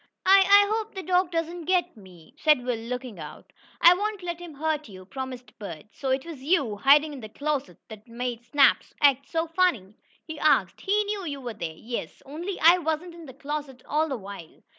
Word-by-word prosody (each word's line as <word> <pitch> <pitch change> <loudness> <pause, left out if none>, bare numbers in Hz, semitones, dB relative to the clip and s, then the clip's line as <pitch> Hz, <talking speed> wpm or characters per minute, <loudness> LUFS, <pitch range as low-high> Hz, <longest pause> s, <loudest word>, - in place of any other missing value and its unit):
"I 390 +1 +8
I 405 +1 +6
hope 445 -1 -3
the 380 - -5
dog 365 0 +2
doesn't 335 0 -3
get 365 +1 +1
me!" 180 -6 -16
said 300 -5 +3
Will, 250 -1 0
looking 240 +1 -6
about. - - -11 0.3
"I 345 - +9
won't 410 +1 -3
let 345 -1 -4
him 345 -4 -10
hurt 305 -2 -2
you," 185 -2 -12
promised 260 +2 -8
Bert. 190 -3 -8
"So 270 - -4
it 265 +2 0
was 320 -6 -9
you, 275 - +1
hiding 290 +6 +5
in 280 - -8
the 215 -3 -9
closet 280 - -3
that 215 0 -12
made 240 0 -5
Snap 280 +3 +4 0.2
act 275 -1 +3
so 325 0 0
funny?" 325 - 0 0.3
he 315 -2 -8
asked. 310 - +2
"He 415 +2 +1
knew 410 -2 -4
you 285 -2 -4
were 245 -3 -6
there." 170 -6 -6
"Yes, 235 +1 -6
only 340 +7 -6
I 340 +3 +7
wasn't 320 +1 -3
in 335 -2 -12
the 260 - -10
closet 285 -3 -6
all 310 +2 0
the 265 - -2
while. 195 -5 -11
290 Hz, 205 wpm, -26 LUFS, 245-345 Hz, 0.3 s, I